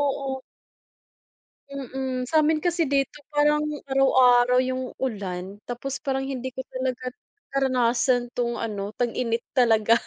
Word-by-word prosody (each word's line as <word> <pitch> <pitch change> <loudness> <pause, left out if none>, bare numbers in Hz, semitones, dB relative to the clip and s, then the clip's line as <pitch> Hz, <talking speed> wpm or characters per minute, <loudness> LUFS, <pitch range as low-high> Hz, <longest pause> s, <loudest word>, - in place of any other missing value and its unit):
oo. 270 -2 -1 1.3
Mm 265 -2 -3
samin 310 -1 +3
kasi 345 -3 +1
dito 275 +1 0
parang 295 0 +3 0.3
araw-araw 250 -2 +5
yung 255 0 -3
ulan 195 -5 -4
tapos 250 +3 -4
parang 270 -2 -1
hindi 260 -2 -4
ko 260 - -4
talaga 255 -1 -3 0.4
naranasan 250 -2 +2
tong 240 -1 -1
ano, 210 -3 -4
tag-init 235 -1 -1
talaga. 230 -2 +4
255 Hz, 115 wpm, -25 LUFS, 240-270 Hz, 1.3 s, araw-araw